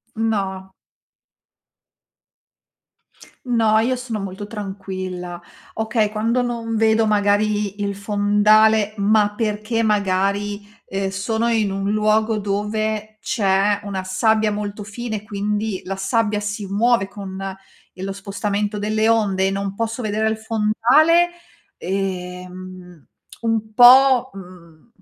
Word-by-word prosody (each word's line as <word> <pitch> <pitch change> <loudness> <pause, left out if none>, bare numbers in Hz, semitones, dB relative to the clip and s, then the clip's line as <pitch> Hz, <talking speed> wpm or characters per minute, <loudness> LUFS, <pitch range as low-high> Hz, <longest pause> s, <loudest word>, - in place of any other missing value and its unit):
No. 195 -4 -2 2.7
No 225 -3 +2
io 255 +3 0
sono 235 -4 -5
molto 195 +1 -6
tranquilla, 190 -4 -6 0.3
okay, 220 -1 0
quando 230 +3 0
non 230 -2 -3
vedo 220 0 +3
magari 205 0 +1
i - - -1
il 200 -1 -2
fondale, 210 +1 +3
ma 205 0 +2
perché 215 +1 -1
magari, 205 0 0 0.2
ehm, 195 0 -2
sono 220 +4 -1
in 215 -4 +1
un 195 +1 -2
luogo 215 +1 +2
dove 215 +1 -2
c'è 205 -3 +1
una 195 -2 -4
sabbia 215 +3 +1
molto 205 0 -5
fine, 220 -1 -5
quindi 210 0 -2
la 195 +1 -4
sabbia 210 +1 0
si 205 0 -4
muove 210 +1 +2
con 195 -2 -8 0.6
il 185 +1 -7
lo 195 - -3
spostamento 205 +1 -3
delle 215 +2 0
onde 195 -4 +2
e - - 0
non 195 0 -3
posso 225 +2 -3
vedere 215 +1 0
il 220 0 -2
fondale, 235 +11 +3 0.5
ehm 180 -2 -6 0.4
un 220 -1 -1
po', 260 +1 +7
uhm 180 -1 -14
210 Hz, 120 wpm, -21 LUFS, 195-220 Hz, 2.7 s, po